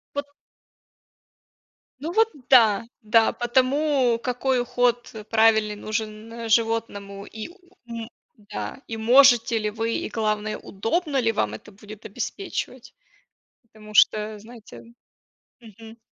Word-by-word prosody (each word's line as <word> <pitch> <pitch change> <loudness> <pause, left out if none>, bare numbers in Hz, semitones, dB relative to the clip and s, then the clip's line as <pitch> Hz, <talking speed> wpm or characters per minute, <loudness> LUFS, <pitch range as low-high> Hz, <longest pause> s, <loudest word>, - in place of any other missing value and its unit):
Вот 285 0 -2 1.7
Ну, 310 +5 -4
вот 445 +4 +4 0.2
да, 225 -5 +5 0.2
да, 225 +1 +3
по 240 - -4
тому, 260 0 +2
какой 250 +1 0
уход 245 0 0 0.2
правильный 220 -1 +3
нужен 220 +2 -5
животному 215 -3 -1
и, 220 +5 -8 0.4
ум 230 -1 -7 0.3
да, 210 +5 -7
и 225 - -5
можете 240 0 +5
ли 210 0 -1
вы, 225 +2 -2
и - - -3
главное, 215 -1 -2
удобно 275 - -2
ли 225 -1 +2
вам 105 - -1
это 110 - -10
будет 210 +1 -13
обеспечивать. 255 - -6 0.7
Потому 215 -2 -15
что, 215 0 +3
знаете. 225 +1 -13 0.8
Мгм. 225 0 -14
225 Hz, 115 wpm, -24 LUFS, 215-245 Hz, 1.7 s, да